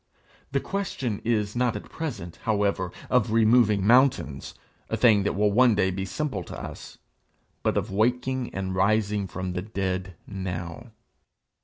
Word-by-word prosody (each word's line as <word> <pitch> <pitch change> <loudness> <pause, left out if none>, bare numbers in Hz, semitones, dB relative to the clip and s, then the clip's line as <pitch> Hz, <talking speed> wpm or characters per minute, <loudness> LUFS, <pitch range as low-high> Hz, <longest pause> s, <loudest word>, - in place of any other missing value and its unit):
The 140 - +1
question 135 - -3
is 105 -2 0
not 125 -2 +1
at 105 - -6
present, 110 - -5
however, 100 -4 0 0.2
of 125 -3 +2
removing 110 -3 +4
mountains, 120 - +3 0.3
a - - -1
thing 110 -5 +5
that 100 - -1
will 105 +1 +2
one 120 +1 +5
day 95 -2 +2
be 95 +1 -3
simple 130 -2 -3
to - - -8
us, - - -9 0.6
but - - 0
of - - -1
waking 125 +4 0
and 95 -1 -3
rising 100 +1 +1
from 95 0 -4
the 90 - -2
dead 95 -3 -3
now. 95 +3 -5
105 Hz, 150 wpm, -26 LUFS, 95-120 Hz, 0.6 s, thing